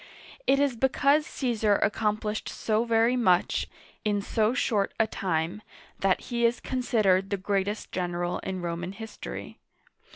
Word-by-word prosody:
It 275 - +4
is 280 -3 +2
because 280 +4 +3
Caesar 225 -5 +1
accomplished 210 +1 0
so 220 +1 0
very 230 +1 +3
much 185 -8 +2 0.4
in 210 -2 +1
so 220 +3 +1
short 210 -7 0
a 220 - +5
time 185 -2 -2 0.4
that 195 -1 +2
he 235 -1 -2
is 235 +1 +3
considered 215 -7 +1
the 200 - 0
greatest 200 +2 -2
general 175 -1 -2
in 185 -2 -4
Roman 175 +2 -3
history. 220 +1 -8
215 Hz, 135 wpm, -27 LUFS, 190-235 Hz, 0.4 s, a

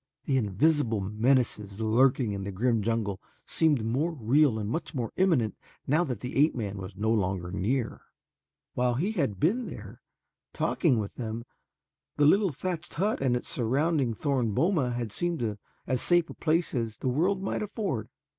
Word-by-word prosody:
The 135 - +1
invisible 120 - +2
menaces 105 0 0
lurking 120 +1 +3
in 100 -1 -4
the 100 - -4
grim 115 +3 +1
jungle 105 -2 -1 0.2
seemed 150 -8 +2
more 135 +9 0
real 135 -1 +3
and 105 -2 -3
much 160 +7 -3
more 120 -4 -3
imminent 155 - +2 0.3
now 155 +6 +3
that 125 - -4
the 125 - -4
ape 150 +3 +4
man 105 -4 -4
was 95 +1 -7
no 110 +3 0
longer 95 -5 0
near. 115 +6 -1 0.7
While 125 -1 +1
he 180 - 0
had 135 - -1
been 230 +10 +1
there - - -9 0.5
talking 150 -9 +2
with 105 -2 -3
them, 115 -1 -4 0.7
the 145 - +4
little 195 +4 +4
thatched 175 +4 -5
hut 200 +4 0
and 125 -2 +2
its - - -7
surrounding 135 +1 +1
thorn 125 -6 0
boma 165 -7 +2
had 120 -3 -3
seemed 120 -10 -2 0.3
as 130 -2 0
safe 175 -1 +2
a - - -7
place 165 +2 0
as 115 -4 -2
the - - -4
world 180 +9 +1
might - - -2
afford. 200 - -3
125 Hz, 170 wpm, -28 LUFS, 110-155 Hz, 0.7 s, ape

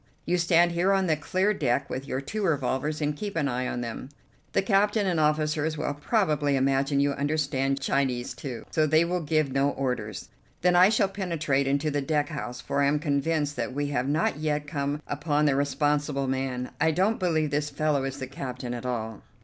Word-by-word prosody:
You 180 +1 +1
stand 170 0 +4
here 175 +3 +2
on 195 -1 +2
the 160 -3 +2
clear 185 +7 0
deck 140 -5 0
with 135 +2 -5
your 130 - -2
two 210 +10 -4
revolvers 150 -2 0
and 150 0 0
keep 200 +4 -5
an 150 -4 +1
eye 125 -1 -1
on 120 - -3
them. 120 +2 -6 0.4
The - - +2
captain 205 +1 +2
and 175 -4 +1
officers 155 0 +1
will 145 - -1
probably 150 - +1
imagine 135 +1 +2
you 140 0 +3
understand 140 -1 0
Chinese, 130 -4 0
too, 125 -5 -7
so 155 -1 +2
they 155 +2 +4
will 180 +1 -1
give 155 -2 +1
no 135 +1 +2
orders. 125 -7 -3 0.3
Then 180 0 +3
I 180 +2 +7
shall 210 -2 +3
penetrate 165 -8 -1
into 140 +2 +1
the 145 0 0
deck 145 0 0
house, 125 -5 -5
for 140 - -1
I 140 - +4
am 145 +2 +2
convinced 145 0 0
that 125 +1 -3
we 145 0 -1
have 135 -1 -1
not 150 -1 +1
yet 150 -1 -1
come 145 0 -3
upon 150 0 0
the 140 -2 +3
responsible 145 0 0
man. 130 -1 -2
I 160 - +4
don't 190 +8 +1
believe 160 -5 +1
this 150 +1 0
fellow 145 -1 0
is 135 0 -4
the 135 - -4
captain 125 -3 -6
at 120 +1 -5
all." 110 -3 -4
145 Hz, 205 wpm, -27 LUFS, 135-160 Hz, 0.4 s, I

